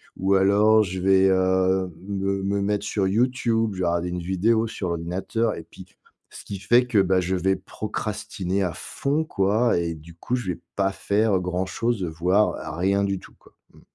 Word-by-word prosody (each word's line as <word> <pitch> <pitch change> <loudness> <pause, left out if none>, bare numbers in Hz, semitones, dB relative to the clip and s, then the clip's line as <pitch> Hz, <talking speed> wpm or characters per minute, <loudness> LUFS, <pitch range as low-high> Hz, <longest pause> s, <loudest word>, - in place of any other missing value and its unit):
ou 95 +1 +1
alors 105 +3 +5
je 95 -1 -4
vais, 95 0 +4
heu, 95 0 +2 0.2
me 100 -1 -1
me 100 0 0
mettre 105 +1 -1
sur 95 -3 0
YouTube, 115 -1 +1
je 95 - -7
vais - - +1
regarder 85 +1 0
une 90 0 -4
vidéo 110 +6 +1
sur 95 -4 -4
ordinateur 95 +7 -2
et - - -8
puis - - -13 0.5
ce - - -11
qui 100 - -5
fait 120 +6 +4
que, 110 -5 +2
bah, 95 -1 +3
je 95 +2 -1
vais 95 +2 +1
procrastiner 105 -3 -4
à 85 -3 -2
fond 145 +3 -2
quoi 105 - +1
et 85 -1 -1
du 80 +2 -14
coup 125 +8 -2
je 115 -8 -2
vais 85 - -12 0.2
pas 100 -1 +1
faire 100 0 +1
grand 90 +1 -2
chose, 115 +1 -1
heu, 90 - -1
voire 85 0 0
rien 100 +3 +1
du 100 -1 -1
tout, - - -16
quoi, - - -22 0.2
mmh. - - -19
95 Hz, 200 wpm, -24 LUFS, 90-105 Hz, 0.5 s, alors